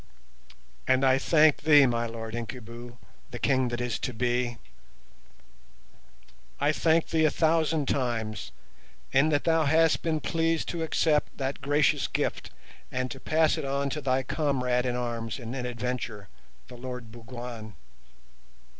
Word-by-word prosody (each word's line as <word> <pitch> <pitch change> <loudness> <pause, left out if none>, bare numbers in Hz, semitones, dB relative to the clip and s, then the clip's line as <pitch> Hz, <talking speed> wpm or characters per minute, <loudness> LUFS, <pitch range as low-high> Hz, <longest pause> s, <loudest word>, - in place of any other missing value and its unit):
And 130 +1 +3
I 130 0 +4
thank 155 0 +4
thee, 145 -3 +6
my 120 -2 0
Lord 115 -1 -7
Incubu—the 120 0 -9
King 130 -2 +2
that 120 0 -3
is 120 -2 -2
to 125 - -3 2.4
be—I 145 +1 +2
thank 160 +1 +2
thee 160 -1 +2
a - - +5
thousand 160 -2 +1
times 115 - -2 0.6
in 135 +4 +4
that 145 -1 +1
thou 165 -1 +2
hast 160 +2 +3
been 160 -2 0
pleased 165 +1 0
to 170 - -3
accept 155 -1 +1
that 135 0 -3
gracious 145 +1 +2
gift, - - -2 0.4
and 130 0 -2
to 135 - -7
pass 155 +2 +2
it - - -4
on 140 0 -1
to 150 - -3
thy 130 -1 +1
comrade 125 -4 0
in 125 - -1
arms 120 -2 -3
and 120 -1 -6
in 125 -2 -3
adventure, 120 -4 -4 0.4
the 125 - -11
Lord 125 -2 -7
Bougwan. 120 -2 -8
130 Hz, 140 wpm, -27 LUFS, 120-150 Hz, 2.4 s, thee